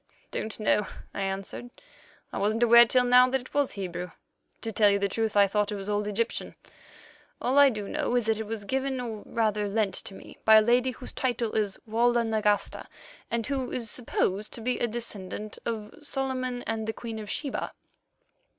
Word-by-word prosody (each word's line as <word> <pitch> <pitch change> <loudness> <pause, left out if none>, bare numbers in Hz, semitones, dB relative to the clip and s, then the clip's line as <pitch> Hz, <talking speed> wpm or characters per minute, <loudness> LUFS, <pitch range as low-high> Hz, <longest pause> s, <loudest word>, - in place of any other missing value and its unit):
"Don't 220 0 -4
know," 210 -1 +2 0.3
I - - -4
answered; 195 +5 -4 0.6
"wasn't 215 +4 +1
aware 235 0 +8
till 250 +2 +4
now 250 +1 +6
that 265 +1 +1
it 250 - -15
was 285 -2 +1
Hebrew. 180 -2 -5 0.5
To 225 - -3
tell 210 -1 +4
you 200 - +3
the 200 0 +1
truth, 220 +1 -1
I 200 - +7
thought 210 +1 0
it - - -2
was 195 0 -5
old 205 0 0
Egyptian. 225 +3 -2 0.8
All 265 +3 +2
I 285 -1 +8
do 210 -5 -4
know 245 - -1
is 245 -3 +2
that 220 -1 +1
it 220 - -4
was 220 -1 -4
given, 265 +2 -1
or 225 -4 -5
rather 210 -2 0
lent, 205 -1 0
to 195 - -4
me - - -13
by 220 - +7
a 215 - +9
lady 245 +3 +3
whose 250 0 -8
title 240 -3 -1
is 205 -3 0
Walda 235 +2 +3
Nagasta, 215 -2 0 0.4
and 235 -1 -1
who 265 -3 -2
is 235 -3 -2
supposed 210 -4 -1
to 230 - -5
be 250 +2 -1
a 240 - +1
descendant 215 -2 -5
of 215 -2 -4
Solomon 260 -3 -3
and 220 -1 -3
the 220 - -1
Queen 225 -1 -6
of 210 -1 -7
Sheba." 280 - -2
225 Hz, 195 wpm, -28 LUFS, 210-245 Hz, 0.8 s, a